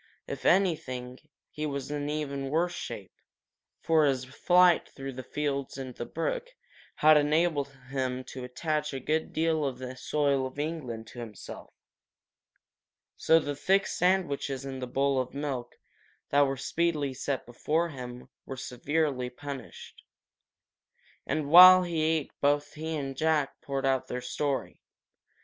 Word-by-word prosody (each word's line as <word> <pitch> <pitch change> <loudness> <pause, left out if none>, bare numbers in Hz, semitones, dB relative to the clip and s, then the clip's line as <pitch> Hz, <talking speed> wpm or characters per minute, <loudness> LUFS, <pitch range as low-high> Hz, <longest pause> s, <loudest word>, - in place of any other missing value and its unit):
If - - -4
anything, 130 -9 +1 0.3
he 150 0 -3
was 140 -1 -4
in 145 0 -2
even 140 -2 -3
worse 170 +4 +1
shape, - - -7 0.7
for 160 -1 +3
his 130 -2 +1
flight 175 +6 +4
through 135 -1 -7
the 130 - -6
fields 140 0 -3
and 130 -2 -6
the 120 - -6
brook 480 - -2 0.5
had 155 0 +6
enabled 150 -1 +2 0.2
him 130 -1 -2
to 130 0 -8
attach 150 +3 -2
a - - -3
good 155 +4 -1
deal 160 -1 +1
of 135 -3 -2
the 130 0 -7
soil 140 0 0
of 130 - -13
England 145 -7 -4
to 120 - -10
himself. 110 -4 -9 1.4
So 160 - +4
the 145 -2 -3
thick 195 +7 +2
sandwiches 145 -7 0
and 135 -1 -6
the 125 - -3
bowl 135 +1 +1
of 130 +1 -8
milk 135 -4 -4 0.6
that 145 0 +5
were 135 0 -2
speedily 150 0 0
set 135 0 -3
before 155 +8 -1
him 125 -4 -8 0.2
were 135 - -7
severely 135 0 -1
punished. 135 -1 -9 1.3
And 150 +1 -1
while 185 +3 +10
he 170 -3 -1
ate 155 -2 +1
both 145 +1 +1
he 160 +1 -4
and 135 -2 -4
Jack 155 -1 0
poured 135 -1 -3
out 135 -1 +1
their 125 - -3
story. 135 +2 -3
140 Hz, 145 wpm, -29 LUFS, 130-155 Hz, 1.4 s, while